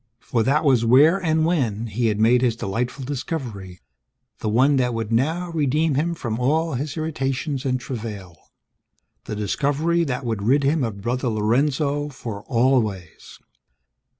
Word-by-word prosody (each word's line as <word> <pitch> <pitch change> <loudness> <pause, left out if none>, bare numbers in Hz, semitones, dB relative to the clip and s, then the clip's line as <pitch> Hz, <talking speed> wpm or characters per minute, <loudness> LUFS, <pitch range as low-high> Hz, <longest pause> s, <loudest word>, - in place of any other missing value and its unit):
For 115 0 -1
that 140 +7 +2
was 130 -5 +4
where 145 +11 +5
(and 160 -1 +2
when) 120 - 0
he 115 +2 -1
had 105 -1 0
made 120 +3 +4
his 120 -3 +1
delightful 120 +6 -3
discovery, 125 - -5 0.6
the 110 - -2
one 135 +6 +3
that 125 -2 +1
would 115 -1 -3
now 160 +9 0
redeem 155 0 +1
him 165 +5 0
from 115 -7 -4
all 155 +5 +1
his 140 +5 -4
irritations 140 -2 -2
and 130 -1 0
travail. 105 -8 -7 0.9
The 105 - -4
discovery 145 - 0
that 130 -2 -3
would 110 -3 -2
rid 135 +7 +2
him 145 +1 +2
of 105 -4 -4
Brother 125 +3 -1
Lorenzo 140 +6 0
for 115 -7 -7
always! 115 - -1
130 Hz, 150 wpm, -22 LUFS, 115-145 Hz, 0.9 s, where